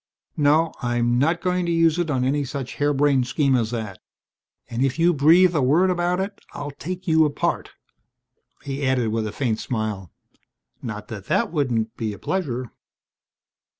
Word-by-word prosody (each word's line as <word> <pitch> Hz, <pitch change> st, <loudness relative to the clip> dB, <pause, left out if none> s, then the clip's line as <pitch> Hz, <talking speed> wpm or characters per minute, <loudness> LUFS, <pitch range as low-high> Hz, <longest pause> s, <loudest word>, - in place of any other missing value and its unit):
No. 155 Hz, +2 st, +3 dB
I'm 120 Hz, -1 st, +1 dB
not 165 Hz, +5 st, +1 dB
going 180 Hz, -1 st, 0 dB
to -, -, 0 dB
use 165 Hz, 0 st, +3 dB
it 175 Hz, -2 st, -1 dB
on 130 Hz, -3 st, 0 dB
any 140 Hz, +3 st, +1 dB
such 135 Hz, -1 st, -6 dB
harebrained 145 Hz, -3 st, +2 dB
scheme 140 Hz, 0 st, +2 dB
as 115 Hz, -3 st, +1 dB
that. 110 Hz, -5 st, -5 dB, 0.7 s
And 120 Hz, +1 st, -2 dB
if 135 Hz, +1 st, 0 dB
you 170 Hz, +1 st, +4 dB
breathe 170 Hz, +5 st, +5 dB
a 150 Hz, -, +2 dB
word 165 Hz, +9 st, +3 dB
about 175 Hz, 0 st, 0 dB
it 195 Hz, +1 st, -4 dB
I'll 145 Hz, 0 st, -5 dB
take 180 Hz, +6 st, -7 dB
you 160 Hz, -1 st, +5 dB
apart." 150 Hz, -2 st, -1 dB, 0.9 s
He 140 Hz, +1 st, -4 dB
added 130 Hz, -4 st, +1 dB
with 110 Hz, 0 st, -1 dB
a -, -, -4 dB
faint 115 Hz, -2 st, -1 dB
smile, 110 Hz, -6 st, -3 dB, 0.7 s
"Not -, -, -6 dB
that -, -, -7 dB
that -, -, 0 dB
wouldn't 120 Hz, -8 st, -1 dB
be 110 Hz, -2 st, -2 dB
a -, -, -9 dB
pleasure." 130 Hz, -, -3 dB
140 Hz, 170 wpm, -23 LUFS, 120-165 Hz, 0.9 s, breathe